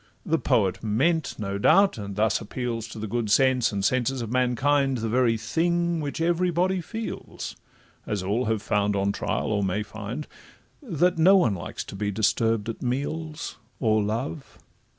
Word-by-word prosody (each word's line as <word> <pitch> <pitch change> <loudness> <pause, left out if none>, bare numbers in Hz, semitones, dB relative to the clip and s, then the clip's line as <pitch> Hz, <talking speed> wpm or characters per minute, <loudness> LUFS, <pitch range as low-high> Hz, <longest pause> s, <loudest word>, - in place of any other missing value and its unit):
The 165 -3 +1
poet 100 -8 +1
meant, 140 +10 +1
no 100 -1 -3
doubt, 195 - +4
and 100 -1 -6
thus 105 0 +1
appeals 115 0 -4
To 110 - -10
the 110 - -4
good 115 0 -2
sense 130 +1 +3
and 100 -1 -1
senses 130 +1 +1
of 115 - -6
mankind, 135 +2 +2
The 115 -1 -2
very 120 -1 +2
thing 170 +8 0
which 145 +2 -4
every 175 +2 +2
body 180 +2 +1
feels, 220 +6 -6 0.5
As 105 -3 -2
all 105 +7 0
have 110 -2 -1
found 105 0 +1
on 100 0 +1
trial, 100 - -2
or 105 -1 +1
may 95 +3 0
find, 110 +7 -6 0.6
That 180 - +1
no 190 +4 +7
one 120 - +3
likes 85 - -5
to - - -9
be 100 +1 -2
disturb'd 110 +1 +1
at 115 - -5
meals 150 +5 -3 0.2
Or 110 -1 +3
love. 120 +8 -4
120 Hz, 170 wpm, -26 LUFS, 105-155 Hz, 0.6 s, no